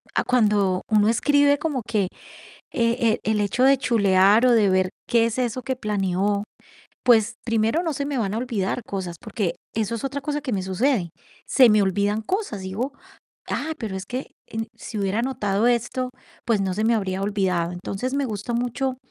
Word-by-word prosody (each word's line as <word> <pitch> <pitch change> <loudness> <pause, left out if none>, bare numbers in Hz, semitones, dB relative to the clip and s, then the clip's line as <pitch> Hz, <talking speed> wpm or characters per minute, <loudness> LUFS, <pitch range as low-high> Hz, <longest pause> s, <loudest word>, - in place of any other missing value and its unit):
ah, - - +2
cuando 205 -6 +2
uno 210 -1 +4
escribe, 285 +4 +3
como 285 -6 -2
que 200 -4 +1 0.6
e 230 -1 +1
e 220 - 0
el 210 - +1
hecho 205 +5 0
de 270 +1 +6
chulear, 205 -2 +4
o 250 - +5
de 215 -4 +4
ver, 185 0 +2 0.2
qué 235 -1 +3
es 230 +1 -2
eso 250 0 -1
que 260 - -2
planeó, 200 -2 0 0.6
pues, 235 -2 +4
primero, 230 +7 +1
no 325 -3 -1
se 280 - -2
me 280 -3 -2
van 205 -2 -1
a - - -1
olvidar 235 -2 -2
cosas, 185 -3 -4
porque 200 -5 -2 0.2
eso 220 0 -1
es 230 - -5
otra 280 +1 -2
cosa 295 +1 -2
que 255 - -3
me 195 -3 -1
sucede, 190 +1 0 0.4
se 255 -3 +6
me 210 - +5
olvidan 205 +3 +1
cosas, 370 - -2
digo: 220 +9 -3 0.6
"Ah, 315 +2 -2
pero 210 -5 -4
es 190 0 -6
que 255 +2 -5 0.2
en 225 0 -4
si 215 - -7
hubiera 200 +2 0
anotado 220 -4 0
esto, 245 +1 0 0.4
pues, 225 -4 +2
no 190 -1 0
se 215 +3 -1
me 230 - +3
habría 195 -3 -1
olvidado". 190 -4 0
Entonces, 195 +8 -4
me 280 0 +1
gustó 220 0 -4
mucho, 250 +2 -1
220 Hz, 190 wpm, -23 LUFS, 195-250 Hz, 0.6 s, de